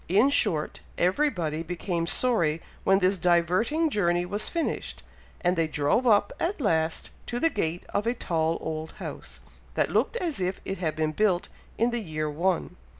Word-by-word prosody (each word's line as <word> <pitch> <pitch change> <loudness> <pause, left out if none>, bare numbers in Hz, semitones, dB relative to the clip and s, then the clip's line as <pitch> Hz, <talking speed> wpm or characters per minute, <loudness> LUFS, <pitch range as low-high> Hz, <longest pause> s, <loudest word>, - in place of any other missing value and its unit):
In 215 +10 +4
short, 155 - +2 0.2
everybody 180 - +1
became 170 0 -2
sorry 170 -10 +2 0.2
when 195 - +5
this 190 0 +2
diverting 180 - +2
journey 175 -5 +1
was 205 +4 -2
finished, 335 -2 -3 0.4
and 180 +1 +2
they 165 -2 +1
drove 150 - +1
up, 205 -2 +4
at 345 +3 -1
last, 160 - 0 0.2
to 240 - -2
the 330 +3 +3
gate 175 -4 -2
of 205 +2 -1
a 240 - +1
tall 165 -6 0
old 160 0 -4
house, - - -8 0.3
that - - +1
looked - - +1
as 335 - -2
if 185 +1 -1
it 195 - -4
had 160 -4 -1
been 155 -1 0
built 185 0 +1 0.3
in 235 +2 +2
the 240 -1 -1
year 155 -5 -3
one. 175 +4 -1
180 Hz, 170 wpm, -27 LUFS, 165-225 Hz, 0.4 s, when